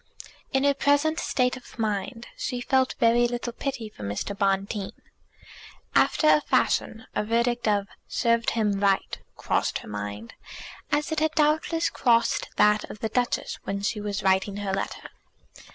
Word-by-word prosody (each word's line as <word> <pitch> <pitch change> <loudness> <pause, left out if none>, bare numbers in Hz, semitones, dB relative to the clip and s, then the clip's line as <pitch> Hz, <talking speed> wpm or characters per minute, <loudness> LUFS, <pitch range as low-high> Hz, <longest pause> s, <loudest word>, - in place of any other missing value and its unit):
In 265 -1 +1
her 285 0 +4
present 285 +4 +2
frame 250 -1 +1
of 255 -1 -13
mind 220 +2 -2
she 250 -2 -3
felt 260 +1 +1
very 235 +1 +4
little 240 0 -4
pity 255 -3 -4
for 210 - -14
Mr. 100 - -3
Bonteen. 195 0 -1 1.0
After 310 - +3
a 300 - +6
fashion 225 -5 0
a - - 0
verdict 235 +2 0
of 205 -1 +2 0.2
"served 230 -1 +1
him 205 -3 +1
right" 195 -1 +1 0.2
crossed - - 0
her - - -11
mind, 105 +1 -6 0.6
as 295 +2 0
it 315 - 0
had 315 0 0
doubtless 315 +2 +2
crossed 235 -2 +2
that 210 0 +4
of 210 - -10
the 220 - -1
Duchess 245 +2 -1
when 200 0 -3
she 210 +1 -1
was 205 0 -3
writing 195 +1 +2
her 200 -2 -3
letter. 195 - -4
230 Hz, 155 wpm, -26 LUFS, 200-260 Hz, 1.0 s, a